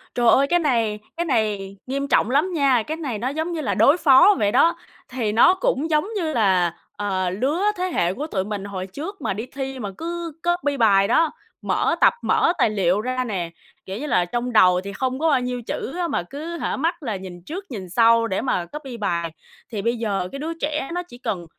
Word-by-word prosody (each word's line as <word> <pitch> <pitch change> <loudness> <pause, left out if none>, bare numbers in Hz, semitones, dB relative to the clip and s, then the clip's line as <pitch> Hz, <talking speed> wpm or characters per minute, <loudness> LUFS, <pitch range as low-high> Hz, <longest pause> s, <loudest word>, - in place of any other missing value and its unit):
Trời 240 -1 +2
ơi, 275 +3 +5
cái 350 +3 +3
này 230 -8 +1 0.2
cái 345 - -1
này 210 - -1
nghiêm 275 +1 -2
trọng 235 - +3
lắm 300 +8 +2
nha! 270 -7 +3
Cái 315 - -3
này 270 -9 -3
nó 245 - -2
giống 315 +4 -3
như 330 - -3
là - - -1
đối 290 +5 +5
phó 340 +6 +6
vậy 205 -1 +2
đó, 325 +7 +4 0.3
thì 240 -5 -2
nó 340 - +6
cũng 380 - -1
giống 305 +4 +2
như 325 -5 -1
là, 185 -7 +2 0.2
ờ, 190 -3 -1
lứa 265 - -1 0.2
thế 365 - -1
hệ 175 +2 +1
của 295 +7 -5
tụi 190 -9 -1
mình 205 -1 -5
hồi 190 -2 -5
trước 325 - -7
mà - - -1
đi 220 +5 -5
thi 270 -1 -6
mà 205 - -4
cứ 340 0 -4
copy 345 -5 0
bài 200 -4 +4
đó, 325 -2 +3 0.3
mở - - +1
tập, - - +6
mở - - +2
tài 230 - +3
liệu 195 -1 +1
ra 255 +1 -1
nè. 185 -8 -3 0.4
Kiểu 190 +1 -5
như 300 - -4
là, 180 -10 +2
trong 240 +6 -3
đầu 180 -4 +5
thì 200 0 -6
không 260 +4 -2
có 320 0 +2
bao 275 - +3
nhiêu 250 0 -3
chữ 300 - -4
á 350 -1 0
mà 175 - -1
cứ 315 - -7
hả, - - -2
mắt 330 +3 -1
là 225 -6 -2
nhìn 185 -2 -8
trước 380 +4 -6
nhìn 190 -5 -6
sau 230 +3 +4
để 190 - -1
mà 180 -9 -1
copy 270 - -8
bài. 170 -6 -2 0.4
Thì 205 -3 -3
bây 235 +2 0
giờ 200 -5 -1
cái 275 - -6
đứa 320 +3 -3
trẻ 295 -2 -2
nó 355 - -2
chỉ 335 -9 -14
cần 185 -8 -4
250 Hz, 235 wpm, -22 LUFS, 200-305 Hz, 0.4 s, phó